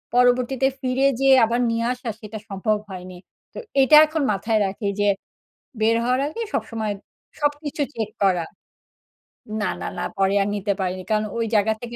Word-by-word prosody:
পরবর্তীতে 250 +2 +3
ফিরে 260 +1 +2
যেয়ে 270 -1 +6
আবার 240 +2 0
নিয়ে 230 0 0
আসা, 245 -2 -6
সেটা 215 -1 -8
সম্ভব 210 +2 0
হয়নি। 185 -1 -8 0.4
তো - - -11 0.3
এটা 300 +3 +7
এখন 310 0 -2
মাথায় 215 +2 0
রাখি 200 +2 -4
যে, 205 - +3 0.7
বের 225 +1 +3
হওয়ার 255 +2 +1
আগে 460 +9 -5
সবসময় 220 -3 -2 0.5
সবকিছু 290 +1 -1
চেক 220 -2 -3
করা 180 -4 +3 1.2
না, - - 0
না, - - -3
না - - -2
পরে 195 +1 +2
আর - - -2
নিতে 200 0 -1
পারিনি। 185 0 -2
কারণ 215 0 +2
ওই 230 - 0
জাগা 215 +1 +3
থেকে 240 0 -7
225 Hz, 165 wpm, -23 LUFS, 205-255 Hz, 1.2 s, এটা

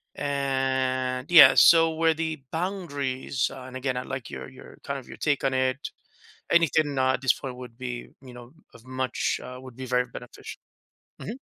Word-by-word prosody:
And 130 -2 -1
yeah, 170 -3 +9
so 165 -1 +7
where 160 0 +2
the 160 -2 -4
boundaries, 145 -8 -2
uh 130 -1 -9
and, 130 - -11
again, 130 -1 -2
I 125 - -3
like 130 -3 -6
your - - -7
your 130 - -14
kind 140 0 -3
of 130 - -11
your - - -10
take 145 -3 0
on 135 - +1
it, 130 +1 -1 0.6
anything, 155 -3 +3
uh, 130 0 +3
at 125 - -2
this 135 -1 +3
point 130 -2 -7
would 125 -2 -10
be, 125 -1 -6
you 130 -2 -12
know, 120 +1 -12 0.2
of 115 - -17
much, 130 0 -2
uh, 125 0 -8
would 130 -2 -12
be 130 - -7
very 125 0 +1
beneficial. 125 0 -10 0.6
Mhm. 215 - -6
130 Hz, 190 wpm, -26 LUFS, 130-145 Hz, 0.6 s, yeah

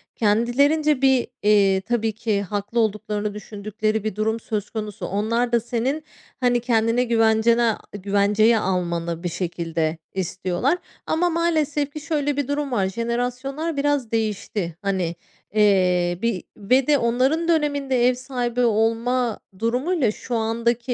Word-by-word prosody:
kendilerince 265 +7 +2
bir, 265 -2 +3 0.2
iii, 200 -2 +4
tabii 225 +1 0
ki 215 -2 -1
haklı 205 +4 -3
olduklarını 210 -1 -1
düşündükleri 215 +1 -3
bir 215 -2 -3
durum 220 +1 0
söz 210 -2 -4
konusu. 210 -3 -5
Onlar 230 +4 0
da 235 - +4
senin, 250 +6 -2 0.4
hani, 245 -1 +2
kendini 230 +1 +1
güvencene 225 0 +3 0.2
güvenceye 205 +3 +3
almanı 170 -3 -2
bir 175 - -1
şekilde 165 -2 -2 0.2
istiyorlar, 185 - -1 0.3
ama 350 +2 +1
maalesef 310 -4 0
ki 305 - -5
şöyle 290 -2 -1
bir 285 -3 -1
durum 285 -1 -2
var, 200 -6 +1
jenerasyonlar 250 - -3
biraz 280 -5 0
değişti. 210 -5 -2
Hani, 185 -4 -1 0.4
eee, 180 -4 +3
bir 230 -6 -1
ve 250 +6 +2
de 295 -1 +5
onların 260 +8 +1
döneminde 285 -6 +2
ev 255 - +4
sahibi 250 -1 -2
olma 230 +1 +1 0.2
durumuyla 250 - +1
şu 240 +2 -5
andaki 235 +2 0
230 Hz, 130 wpm, -23 LUFS, 205-255 Hz, 0.4 s, de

